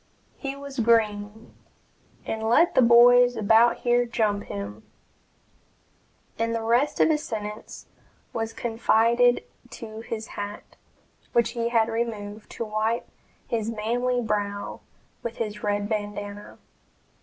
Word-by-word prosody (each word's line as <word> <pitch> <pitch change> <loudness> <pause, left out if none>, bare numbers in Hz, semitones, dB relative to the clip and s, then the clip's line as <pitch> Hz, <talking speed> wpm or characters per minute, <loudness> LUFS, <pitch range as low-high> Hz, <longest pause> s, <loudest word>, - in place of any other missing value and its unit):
He 275 -1 -4
was 280 -1 -8
green, 220 -1 +1 0.7
and 220 - -3
let 335 +9 +4
the - - +5
boys 245 +1 +7
about 225 +2 +4
here 245 0 +3
jump 210 -3 0
him" 100 +1 -6 1.6
and 230 0 0
the 225 - -2
rest 240 +6 +1
of - - +5
his 300 -1 +2
sentence 210 -3 -6 0.5
was 225 0 -2
confided 235 +1 +2 0.3
to 220 -2 -9
his 225 -1 -5
hat, 205 0 -7 0.6
which 235 0 +3
he 235 -1 -2
had 225 -2 +3
removed 220 -2 -4
to 230 - -4
wipe 215 +2 -1 0.4
his 225 -2 -1
manly 240 +3 -1
brow 205 -2 -3 0.4
with 235 0 -5
his 210 -2 -4
red 205 -1 -1
bandanna. 205 -1 -5
225 Hz, 120 wpm, -25 LUFS, 210-235 Hz, 1.6 s, boys